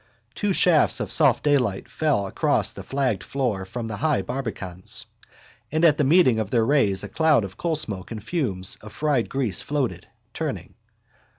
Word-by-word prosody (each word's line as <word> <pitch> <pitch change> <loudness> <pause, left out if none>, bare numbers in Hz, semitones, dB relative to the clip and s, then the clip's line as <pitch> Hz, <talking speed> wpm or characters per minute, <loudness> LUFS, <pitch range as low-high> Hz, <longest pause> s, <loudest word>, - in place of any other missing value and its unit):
Two 205 -1 -1
shafts 160 -9 +3
of 105 -4 -2
soft 145 -6 +4
daylight 130 -10 +1
fell 145 -10 0
across 95 - 0
the - - -9
flagged 130 -7 -1
floor 120 -9 -2
from 115 +4 -6
the 105 -2 -5
high 150 0 +1
barbacans: 105 -8 -5 0.7
and 160 +3 +2
at 150 -2 +4
the - - +3
meeting 135 -5 +4
of 110 -3 -2
their 115 -1 +2
rays 115 -8 +2
a - - -5
cloud 160 -7 +2
of 95 -1 -7
coalsmoke 145 - -1
and 110 -3 -7
fumes 110 - 0
of 105 0 -11
fried 145 -6 0
grease 125 -8 0
floated, 145 -4 -3 0.3
turning. - - -5
125 Hz, 170 wpm, -24 LUFS, 105-150 Hz, 0.7 s, soft